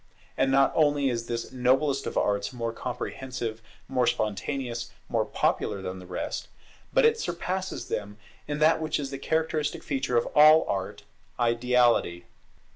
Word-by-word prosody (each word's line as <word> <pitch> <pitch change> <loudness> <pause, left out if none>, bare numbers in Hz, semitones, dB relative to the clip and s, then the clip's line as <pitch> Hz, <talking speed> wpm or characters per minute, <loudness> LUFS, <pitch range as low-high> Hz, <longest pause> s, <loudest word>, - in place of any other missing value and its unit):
And 135 - +2
not 135 0 +4
only 145 -3 +3
is 115 -1 -3
this 115 -1 -4
noblest 135 +2 +1
of - - -4
Arts 100 0 +1
more 115 -2 -3
comprehensive, 120 -2 -5 0.3
more 125 -2 +1
spontaneous, 115 +3 -2 0.2
more 115 -2 0
popular 100 - 0
than 95 0 -5
the 90 - -12
rest, 90 - -4 0.4
but - - +4
it 460 0 +4
surpasses 185 - -3
them 105 0 -4 0.3
in 145 - -2
that 155 +1 +4
which 155 -1 -1
is 140 -1 -4
the 135 - -5
characteristic 160 -1 -1
feature 130 -3 -1
of 120 - +1
all 155 +1 +7
art, 95 -1 -3 0.4
Ideality. 120 -6 +2
125 Hz, 150 wpm, -27 LUFS, 115-150 Hz, 0.4 s, all